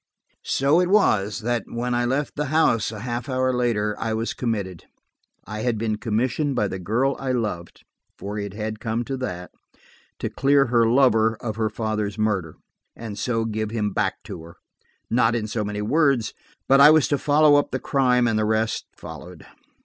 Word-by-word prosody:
So 140 Hz, +5 st, +3 dB
it 180 Hz, 0 st, +1 dB
was, 105 Hz, -, +2 dB
that, 120 Hz, -1 st, -1 dB
when 120 Hz, +1 st, -3 dB
I 120 Hz, 0 st, +1 dB
left 135 Hz, +4 st, -1 dB
the 150 Hz, -, -1 dB
house 130 Hz, -8 st, +2 dB
a 105 Hz, -2 st, -8 dB
half 120 Hz, +3 st, -4 dB
hour 130 Hz, 0 st, +1 dB
later, 110 Hz, -4 st, 0 dB
I 110 Hz, -1 st, -2 dB
was 115 Hz, +1 st, -2 dB
committed. 100 Hz, -8 st, -4 dB, 0.6 s
I 105 Hz, +2 st, -6 dB
had 115 Hz, 0 st, -1 dB
been 110 Hz, -1 st, -1 dB
commissioned 130 Hz, +6 st, -1 dB
by 105 Hz, -5 st, 0 dB
the 95 Hz, -, -5 dB
girl 120 Hz, +9 st, 0 dB
I 130 Hz, -1 st, -2 dB
loved–for 105 Hz, -1 st, -6 dB
it 100 Hz, -1 st, -6 dB
had 110 Hz, 0 st, -4 dB
come 115 Hz, +1 st, -2 dB
to 135 Hz, +3 st, -4 dB
that–to 90 Hz, -9 st, -9 dB
clear 140 Hz, 0 st, +3 dB
her 115 Hz, -2 st, +3 dB
lover 115 Hz, -3 st, +3 dB
of 110 Hz, -3 st, -5 dB
her 110 Hz, -1 st, 0 dB
father's 105 Hz, -2 st, -3 dB
murder, 100 Hz, -7 st, -1 dB, 0.4 s
and 110 Hz, -3 st, -7 dB
so 115 Hz, -2 st, -1 dB
give 110 Hz, -1 st, -3 dB
him 105 Hz, -2 st, -2 dB
back -, -, -1 dB
to -, -, -8 dB
her–not 115 Hz, +7 st, -3 dB
in 115 Hz, -2 st, -1 dB
so 110 Hz, 0 st, -3 dB
many 105 Hz, 0 st, -4 dB
words, 135 Hz, -2 st, +2 dB, 0.3 s
but 135 Hz, +1 st, +5 dB
I 150 Hz, -, +10 dB
was 155 Hz, -2 st, +5 dB
to 145 Hz, -, +1 dB
follow 150 Hz, 0 st, +4 dB
up 145 Hz, -, +1 dB
the -, -, -2 dB
crime, 125 Hz, -3 st, +2 dB
and 110 Hz, -2 st, +1 dB
the -, -, +1 dB
rest 110 Hz, +1 st, -1 dB
followed. -, -, -10 dB
115 Hz, 180 wpm, -23 LUFS, 105-130 Hz, 0.6 s, I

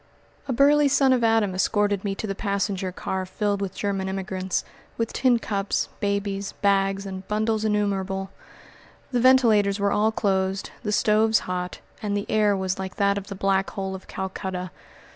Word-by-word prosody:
A -, -, -1 dB
burly 290 Hz, +3 st, +5 dB
son 275 Hz, -1 st, +4 dB
of 245 Hz, -2 st, +1 dB
Adam 225 Hz, -4 st, +3 dB
escorted 205 Hz, +1 st, +1 dB
me 200 Hz, -2 st, -2 dB
to 220 Hz, -, -4 dB
the 200 Hz, -, -2 dB
passenger 195 Hz, -2 st, -2 dB
car 190 Hz, +1 st, -3 dB
filled 200 Hz, +2 st, -2 dB
with 195 Hz, -2 st, -3 dB
German 195 Hz, -2 st, -2 dB
immigrants, 190 Hz, -1 st, -2 dB, 0.3 s
with 230 Hz, -1 st, -2 dB
tin 255 Hz, -2 st, +3 dB
cups, 200 Hz, -3 st, -1 dB
babies, 200 Hz, -1 st, -2 dB
bags, 195 Hz, 0 st, +1 dB
and 190 Hz, -1 st, -7 dB
bundles 215 Hz, +1 st, 0 dB
innumerable. 195 Hz, -2 st, -1 dB, 0.8 s
The 245 Hz, -, +1 dB
ventilators 225 Hz, -6 st, +4 dB
were 200 Hz, 0 st, +1 dB
all 215 Hz, +1 st, +2 dB
closed, 195 Hz, -2 st, -1 dB
the 210 Hz, -, -2 dB
stoves 215 Hz, +1 st, +3 dB
hot, 180 Hz, 0 st, -4 dB, 0.2 s
and 205 Hz, -2 st, -1 dB
the 200 Hz, -, -3 dB
air 210 Hz, -2 st, +3 dB
was 190 Hz, 0 st, -2 dB
like 190 Hz, 0 st, -5 dB
that 200 Hz, 0 st, +2 dB
of 200 Hz, -, -12 dB
the 200 Hz, -, -6 dB
Black 195 Hz, 0 st, +1 dB
Hole 195 Hz, -1 st, -4 dB
of 190 Hz, 0 st, -9 dB
Calcutta. 185 Hz, -1 st, -4 dB
200 Hz, 170 wpm, -25 LUFS, 190-215 Hz, 0.8 s, burly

